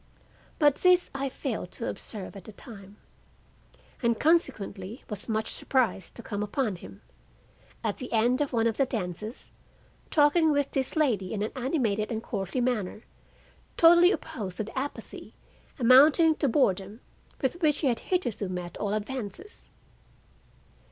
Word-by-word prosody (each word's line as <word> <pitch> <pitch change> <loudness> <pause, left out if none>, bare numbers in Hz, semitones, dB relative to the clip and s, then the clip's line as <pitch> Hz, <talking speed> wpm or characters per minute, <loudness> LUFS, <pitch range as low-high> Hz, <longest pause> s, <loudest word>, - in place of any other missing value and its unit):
But 290 -3 +4
this 365 -1 +4
I 275 0 -2
failed 240 -9 -4
to 230 - -4
observe 205 -3 -6
at 195 - -10
the - - -9
time, 205 -2 -12 1.0
and 235 -2 +1
consequently 225 - 0
was 210 +2 -3
much 220 0 -1
surprised 235 -8 0
to 235 - -9
come 205 -1 -4
upon 210 -1 -1
him, 95 - -13 0.8
at 215 -3 -1
the 255 - -7
end 240 +4 +2
of 290 - -1
one 230 -2 +1
of 225 -1 +1
the 275 - +2
dances, 215 0 -5 0.6
talking 310 +1 +4
With 285 -1 0
this 265 -2 -1
lady 225 - +1
in 205 - -1
an 215 - -3
animated 245 -6 -1
and 225 0 -3
courtly 200 +3 -3
manner 220 -4 -1 0.7
totally 345 +2 +7
opposed 195 - -4
to - - -1
the 220 - -10
apathy, 275 +2 -6 0.4
amounting 285 +6 +6
to 285 - +1
boredom, 200 -4 +1 0.4
with 310 +7 -2
which 300 -3 +2
he 290 - +2
had 240 -3 +1
hitherto 240 - -2
met 180 -1 -5
all 205 0 -1
advances. 255 - -6
235 Hz, 150 wpm, -28 LUFS, 205-280 Hz, 1.0 s, totally